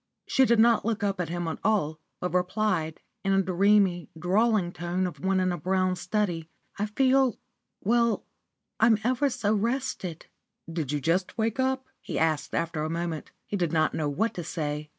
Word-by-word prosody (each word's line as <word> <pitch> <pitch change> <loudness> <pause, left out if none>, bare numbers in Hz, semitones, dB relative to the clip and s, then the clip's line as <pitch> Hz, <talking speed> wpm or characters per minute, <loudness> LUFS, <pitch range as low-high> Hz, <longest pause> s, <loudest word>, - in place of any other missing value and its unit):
She 265 - +4
did 235 -1 +4
not 230 0 +5
look 225 -1 -1
up 195 -2 0
at 170 - -3
him 175 0 -3
at 160 - -3
all, 160 -8 +1 0.2
but 180 -1 -3
replied, 180 -3 0 0.2
in 195 0 +2
the 195 - +3
dreamy, 190 -1 +3
drawling 195 +1 +2
tone 175 +2 -2
of 180 - -5
one 190 0 +2
in 185 0 +1
a 175 - -3
brown 185 +2 +1
study 180 -3 -2 0.3
"I 210 - 0
feel 260 +2 +3 0.4
well. 235 +1 +2 0.5
I'm 225 0 +5
ever 255 +4 +2
so 210 -4 0
rested." 230 - -2 0.5
"Did 155 -5 -2
you 150 - 0
just 180 - 0
wake 225 +2 0
up?" 260 0 +1 0.2
he - - -4
said, 160 -2 +1
after 165 -2 -1
a 155 - -1
moment. 165 -1 -3 0.2
He - - -4
did 175 -5 0
not 155 -1 +2
know 150 -2 -1
what 215 +11 0
to 175 - -5
say. 150 -2 -3
185 Hz, 185 wpm, -27 LUFS, 165-220 Hz, 0.5 s, not